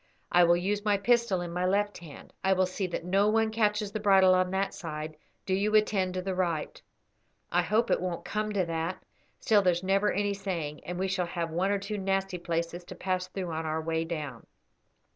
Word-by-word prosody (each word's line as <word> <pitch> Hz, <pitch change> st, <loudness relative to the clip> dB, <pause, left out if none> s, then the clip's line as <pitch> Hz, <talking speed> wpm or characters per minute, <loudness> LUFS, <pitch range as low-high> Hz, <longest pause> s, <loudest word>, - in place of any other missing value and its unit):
I 175 Hz, -, +6 dB
will 170 Hz, 0 st, +5 dB
use 200 Hz, +3 st, -1 dB
my 205 Hz, -1 st, +3 dB
pistol 235 Hz, -2 st, +2 dB
in 175 Hz, -1 st, -5 dB
my 180 Hz, +1 st, -1 dB
left 205 Hz, +3 st, +1 dB
hand. 160 Hz, -4 st, -12 dB
I 190 Hz, 0 st, +4 dB
will 185 Hz, 0 st, +3 dB
see 185 Hz, +1 st, -3 dB
that 170 Hz, -1 st, -4 dB
no 195 Hz, +3 st, +3 dB
one 220 Hz, 0 st, +2 dB
catches 210 Hz, -2 st, +1 dB
the 215 Hz, -, -3 dB
bridle 195 Hz, -3 st, +5 dB
on 185 Hz, 0 st, +2 dB
that 190 Hz, +1 st, -1 dB
side; 155 Hz, -2 st, -6 dB, 0.3 s
do 190 Hz, -, -1 dB
you 205 Hz, +3 st, +1 dB
attend 195 Hz, -4 st, +2 dB
to 185 Hz, -, -2 dB
the 190 Hz, 0 st, -2 dB
right. 170 Hz, -4 st, -2 dB, 0.7 s
I 175 Hz, -, +3 dB
hope 215 Hz, +7 st, +1 dB
it -, -, +2 dB
won't 180 Hz, -2 st, -3 dB
come 215 Hz, 0 st, -2 dB
to 190 Hz, -3 st, +1 dB
that, 165 Hz, +2 st, -3 dB, 0.4 s
still 215 Hz, -4 st, +4 dB
there's 180 Hz, -2 st, +1 dB
never 195 Hz, +2 st, +2 dB
any 205 Hz, +1 st, 0 dB
saying, 170 Hz, -7 st, -4 dB
and 180 Hz, 0 st, -4 dB
we 190 Hz, +1 st, 0 dB
shall 185 Hz, -2 st, -1 dB
have 170 Hz, -1 st, -3 dB
one 180 Hz, +4 st, 0 dB
or 200 Hz, -, +2 dB
two 200 Hz, +1 st, -4 dB
nasty 195 Hz, -1 st, -1 dB
places 170 Hz, 0 st, -3 dB
to 185 Hz, -, -9 dB
pass 185 Hz, 0 st, -2 dB
through 185 Hz, -2 st, -5 dB
on 160 Hz, 0 st, -3 dB
our 155 Hz, +1 st, -1 dB
way 160 Hz, 0 st, -1 dB
down. 150 Hz, -7 st, -6 dB
185 Hz, 220 wpm, -29 LUFS, 170-200 Hz, 0.7 s, I